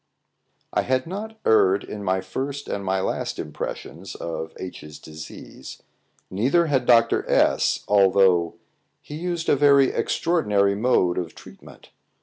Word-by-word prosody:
I - - +2
had 130 0 0
not 210 +5 -7
erred 100 -3 +4
in 105 -1 -7
my 95 -1 0
first 140 +5 -5
and 100 - -4
my 95 0 0
last - - -3
impressions - - -7
of 80 -1 -5
H 95 - -8
's 75 0 -11
disease, 75 -3 -11 0.5
neither 130 - +2
had 135 -5 0
Dr. 115 -1 +4
S - - +2
although 95 -4 +3 0.5
he - - -10
used 170 +1 -4
a - - +4
very 140 -1 +5
extraordinary 105 - +1
mode 100 -5 +1
of 85 -3 -6
treatment. - - -15
105 Hz, 135 wpm, -23 LUFS, 95-140 Hz, 0.5 s, very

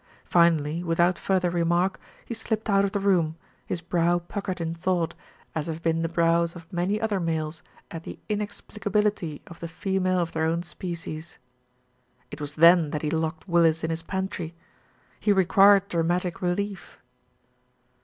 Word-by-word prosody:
Finally, 170 -1 +3
without 170 +1 +2
further 185 -2 +1
remark, 175 +2 +1 0.3
he - - -5
slipped 220 -1 -2
out 195 0 +4
of 200 - 0
the 205 - -1
room, 175 -5 +2 0.3
his 175 - -2
brow 175 0 +2
puckered 185 +1 -4
in 165 -1 -2
thought, 170 0 0 0.4
as 155 -1 -2
have 165 0 -5
been 165 0 +1
the 165 - -1
brows 170 0 +2
of 170 -1 -10
many 180 +4 0
other 215 -3 0
males 160 -2 -2 0.3
at 165 - -6
the - - -8
inexplicability 210 -4 -2
of 170 - -12
the 170 - -5
female 185 +2 0
of 170 -2 0
their 160 0 0
own 165 +2 0
species. 170 -2 -6 0.9
It - - -8
was 145 0 -4
then 170 0 +6
that 150 +1 -3
he 150 - 0
locked 160 +2 -2
Willis 165 -2 +3
in 160 - 0
his 165 0 -2
pantry. 190 -2 -4 0.6
He 210 - +2
required 195 +1 +5
dramatic 175 0 -1
relief. 195 +2 -3
175 Hz, 160 wpm, -26 LUFS, 165-190 Hz, 0.9 s, then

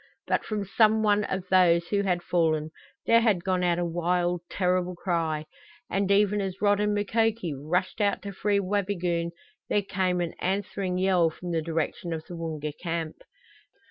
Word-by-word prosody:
But - - 0
from 210 -2 -3
some 220 +2 +3
one 210 -1 +3
of 190 -1 -3
those 170 -2 +4
who 200 -1 +2
had 180 -3 0
fallen 160 -3 +1 0.3
there 230 0 +5
had 210 -7 +2
gone 185 -1 0
out 175 -1 +2
a 175 - 0
wild, 175 +1 0
terrible 180 -1 0
cry, 165 -4 -1 0.5
and 195 0 0
even 205 +1 +3
as 190 -1 -4
Rod 205 -1 +3
and 210 0 +1
Makoki 220 -4 0
rushed 180 +9 -1
out 200 -1 +1
to 200 - -5
free 200 +1 +1
Wabigoon 185 -4 -1 0.4
there 205 - +2
came 185 -2 0
an 175 -1 -2
answering 190 -1 -2
yell 185 -3 +3
from 175 +2 -7
the 165 -1 0
direction 165 +1 -2
of 160 -1 -5
the 175 - -8
Woonga 155 -3 -4
camp. 165 -2 -3
180 Hz, 175 wpm, -27 LUFS, 170-200 Hz, 0.5 s, there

